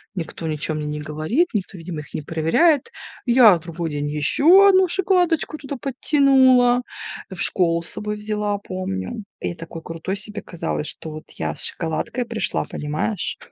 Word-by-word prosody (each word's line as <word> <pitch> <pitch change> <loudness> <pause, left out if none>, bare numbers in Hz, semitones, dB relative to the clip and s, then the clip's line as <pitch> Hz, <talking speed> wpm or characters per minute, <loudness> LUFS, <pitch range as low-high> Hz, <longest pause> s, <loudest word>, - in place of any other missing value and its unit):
никто 165 -2 -5
ничего 155 0 -2
мне 150 - -3
не 150 0 -3
говорит, 155 - 0
никто, 195 -2 -3
видимо, 165 -2 -6
их 150 - -15
не - - -3
проверяет. 205 - +2 0.3
Я 240 -5 +7
в 165 - -6
другой 170 0 -4
день 145 -1 -3
ещё 305 - +5
1 375 -1 +5
шоколадочку 355 -4 +1
туда 280 -1 -6
подтянула, 260 -2 +4 0.5
в 185 - -7
школу 170 -4 +2
с 170 - -8
собой 210 0 -4
взяла, 210 -1 -2
помню. 185 - -5 0.2
И 175 - -3
такой 165 0 -9
крутой 165 +4 -4
себе 210 +1 -6
казалось, 165 -3 -4
что 160 - -6
вот 155 +1 -8
я - - -4
с - - -2
шоколадкой 170 +9 -1
пришла, 230 -1 -2
понимаешь? 155 +6 -3
195 Hz, 165 wpm, -22 LUFS, 160-260 Hz, 0.5 s, Я